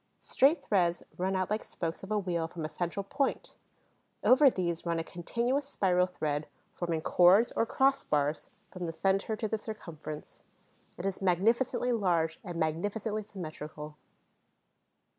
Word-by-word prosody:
Straight 285 +5 +3
threads 175 -4 +1 0.2
run 190 +1 0
out 185 +1 -1
like 215 - 0
spokes 165 -1 -4
of 195 - -9
a 215 - +1
wheel 175 -5 -1
from 165 -1 -6
a - - -4
central 175 +4 -3
point. 270 +7 -1 0.7
Over 270 +2 +7
these 175 -6 -2
runs 170 -1 0
a - - -1
continuous 240 - -1
spiral 180 -5 +2
thread, 155 -4 -2 0.3
forming 170 -2 -2
chords, 185 +8 +5
or 225 - 0
cross 275 +2 +3
bars, 150 +1 0 0.2
from 180 -2 -5
the 165 - -4
center 195 +5 +1
to 220 +1 -2
the 220 +1 -2
circumference. 160 -9 -8 0.6
It 175 - -5
is 195 -1 -2
magnificently 230 +7 +2
large 170 -8 +1
and 175 -3 -6
magnificently 205 +7 -1
symmetrical. 155 -6 -8
185 Hz, 150 wpm, -30 LUFS, 165-215 Hz, 0.7 s, Over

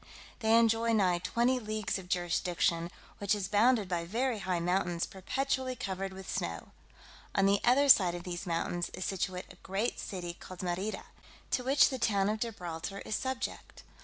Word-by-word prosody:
They 225 -1 +4
enjoy 230 0 +3
nigh 185 -5 +3
twenty 240 +7 +1
leagues 215 -3 -2
of 180 -2 -12
jurisdiction, 175 -1 0 0.3
which 200 +1 +2
is 200 -2 -3
bounded 215 +1 +3
by 175 -2 -1
very 230 +5 -1
high 185 -3 -1
mountains 175 0 0
perpetually 260 +6 -2
covered 195 -4 -4
with 190 0 -9
snow. - - -3 0.7
On 195 - +4
the 200 0 +3
other 265 +4 +5
side 185 -9 +7
of 175 - -6
these 175 +1 -5
mountains 175 +1 -1
is 185 - -4
situate 185 -1 -3
a - - -19
great 195 +7 -2
city 175 -3 -5
called 185 +1 -10
Merida, 185 +4 -2 0.5
to 250 - +1
which 270 +3 +5
the 260 - -4
town 205 -3 +2
of 215 +1 -1
Gibraltar 190 -4 -5
is 215 - -2
subject. 260 +2 -4
195 Hz, 170 wpm, -31 LUFS, 180-230 Hz, 0.7 s, side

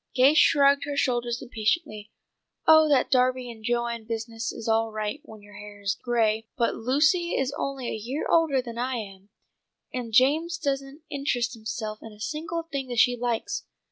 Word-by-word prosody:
'" - - -39
Gay 265 +3 +6
shrugged 280 -2 +5
her 285 -1 -4
shoulders 240 -2 0
impatiently. 215 -1 -2 0.6
"Oh, 315 -1 +7
that 275 -3 +3
Darby 255 -1 +2
and 220 -2 -13
Joan 235 -1 -1
business 225 0 -4
is 225 - -8
all 225 0 +2
right 215 +5 -3
when 215 -2 -13
your 205 0 -15
hair 205 0 -11
is 200 -1 0
gray, 225 -1 0
but 235 -2 +1
Lucy 310 +9 +2
is 270 +1 -1
only 270 -3 -3
a - - -2
year 240 +7 -4
older 310 -6 +3
than 235 -1 -7
I 255 +1 -1
am, 195 -3 -8 0.6
and 245 -3 -4
Jameson 315 +8 +2
doesn't 275 +2 -3
interest 265 -4 -1
himself 215 -1 -5
in 225 - -10
a 210 - -17
single 320 +8 -3
thing 280 -5 -5
that 245 -1 -5
she 245 +2 +5
likes. 245 - -2
245 Hz, 180 wpm, -26 LUFS, 225-280 Hz, 0.6 s, Oh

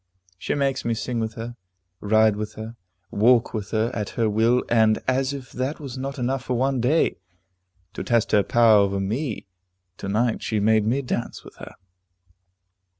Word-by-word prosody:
She - - -2
makes 135 -2 0
me 115 -1 -1
sing 120 +1 -3
with 110 0 -3
her, 120 +1 -6 0.4
ride 110 0 +3
with 105 0 -5
her, 110 +2 -8 0.4
walk 115 +3 +3
with 105 -3 -4
her, 110 +2 0
at 105 -2 -3
her 115 -2 +2
will, 115 +4 +2
and 110 -2 +3
as 130 +1 +1
if 135 -3 -8
that 130 +4 -3
was 140 -5 -7
not 135 +2 -5
enough 130 +1 -2
for 125 - -1
one 130 +1 0
day, 150 +7 +2 0.8
to - - -5
test 115 -2 +1
her 105 - +5
power 115 0 +5
over 100 -1 +1
me, 110 +5 -3 0.5
to 100 - -6
night 110 +3 0
she 110 - -1
made 110 0 +3
me 135 +5 0
dance 120 -1 -4
with - - -15
her. - - -11
115 Hz, 180 wpm, -23 LUFS, 110-130 Hz, 0.8 s, her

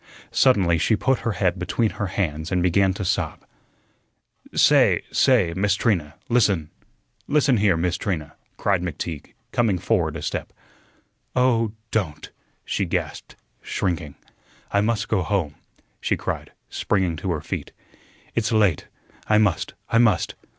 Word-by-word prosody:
Suddenly 95 -10 +3
she 110 - +3
put 135 +4 +1
her 115 - -2
head 90 -1 0
between 100 +5 0
her 100 - -3
hands 80 -3 -2
and 90 -1 +1
began 95 +2 +3
to 100 - -4
sob. - - -2 1.1
"Say, - - +5
say, 110 -11 +3
Miss 100 +1 +2
Trina, 85 -10 0
listen 100 -10 +2 0.6
listen 140 -4 +3
here, 100 -5 +3
Miss 90 +2 0
Trina," 85 -9 -3 0.2
cried 100 -3 +1
McTeague, 80 -3 -5 0.2
coming 110 -6 +2
forward 85 -5 0
a 75 - -7
step. - - -3 0.8
"Oh, 115 -4 +2 0.2
don't!" 80 -9 -2 0.3
she - - -1
gasped, - - -4 0.3
shrinking. 85 -6 -2 0.6
"I 100 - +3
must 105 -1 0
go 105 -4 +1
home," 90 -5 -1 0.5
she - - 0
cried, - - -4 0.2
springing 95 -4 0
to 95 - -4
her 75 - -3
feet. - - -5 0.6
"It's 115 -1 0
late. 105 -8 +2 0.4
I 105 - +4
must. 105 -4 +1
I 115 - +3
must. 110 -7 +3
95 Hz, 140 wpm, -23 LUFS, 85-110 Hz, 1.1 s, Say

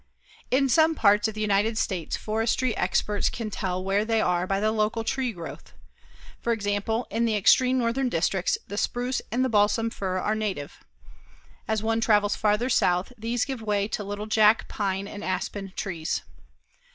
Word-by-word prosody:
In 270 +2 +3
some 320 +4 +4
parts 210 -3 +4
of 220 - -6
the 215 - -4
United 210 +2 +1
States 185 -7 -2
forestry 225 +2 0
experts 205 -1 0
can 220 -3 -5
tell 185 -1 -3
where 195 +2 +1
they 225 0 +1
are 180 -3 +1
by 195 0 0
the 215 +1 +1
local 220 +1 0
tree 255 +1 -1
growth. 170 -5 -9 0.7
For 235 - +1
example, 210 +2 -1
in 230 +3 +1
the 225 -2 +1
extreme 255 +5 +4
northern 250 +2 0
districts 180 0 0
the 205 - -3
spruce 245 +1 -1
and 250 +3 +1
the - - +2
balsam 225 0 +2
fir 185 -3 -3
are 210 +3 0
native. 205 -9 -4 0.9
As 220 -1 -1
one 225 0 +1
travels 210 -2 +3
farther 210 +3 +1
south 180 -3 +1
these 230 +1 -1
give 265 -4 -5
way 205 -2 0
to 210 - -3
little 205 +1 -5
Jack 215 0 +4
pine 195 -1 -2
and 205 0 -8
aspen 190 +1 -3
trees. 170 -5 -3
215 Hz, 175 wpm, -26 LUFS, 200-230 Hz, 0.9 s, some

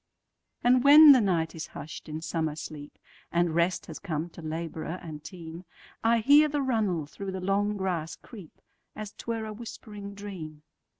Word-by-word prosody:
And 250 +1 +4
when 295 +1 +10
the 260 -3 +7
night 170 -5 0
is 160 - -6
hush'd 155 +2 -8
in 155 +1 -5
summer 160 -1 -2
sleep, 150 -1 -9 0.3
And 170 -1 +1
rest 170 +2 +1
has 160 - -8
come 160 +1 -4
to 170 - -11
laborer 160 +1 -4
and 150 -2 -9
team,I 180 +6 -3
hear 290 +6 +6
the 290 -1 -1
runnel 210 - 0
through 195 +6 -7
the 190 - -4
long 200 +2 0
grass 170 -5 -2
creep, 200 -10 -14 0.3
As 215 -1 -6
't - - -13
were 225 -1 -2
a 215 - -6
whispering 210 -2 -9
dream. 170 -7 -8
185 Hz, 170 wpm, -28 LUFS, 160-215 Hz, 0.3 s, when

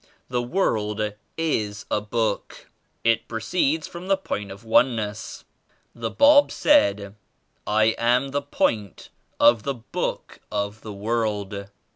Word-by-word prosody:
The 125 -1 0
world 110 - -1 0.2
is 110 -10 -1
a 105 - +1
book. 105 0 -3 0.3
It 115 -1 +2
proceeds 150 +7 0
from 175 +2 -9
the 195 0 +3
Point 105 - -4
9? - - -10
of 100 - -18
Oneness. 110 -2 0 0.5
The 115 -1 -4
Bab 285 - +6
said 100 - +3 0.5
*I 110 +1 +3 0.2
am 125 +3 +2
the 145 +1 0
Point 110 -8 -1 0.3
of 120 -2 +6
the 140 +4 -2
Book 115 - -4
of 105 +1 -3
the 110 - -8
World.'" 105 -2 -2
110 Hz, 130 wpm, -24 LUFS, 105-135 Hz, 0.5 s, Bab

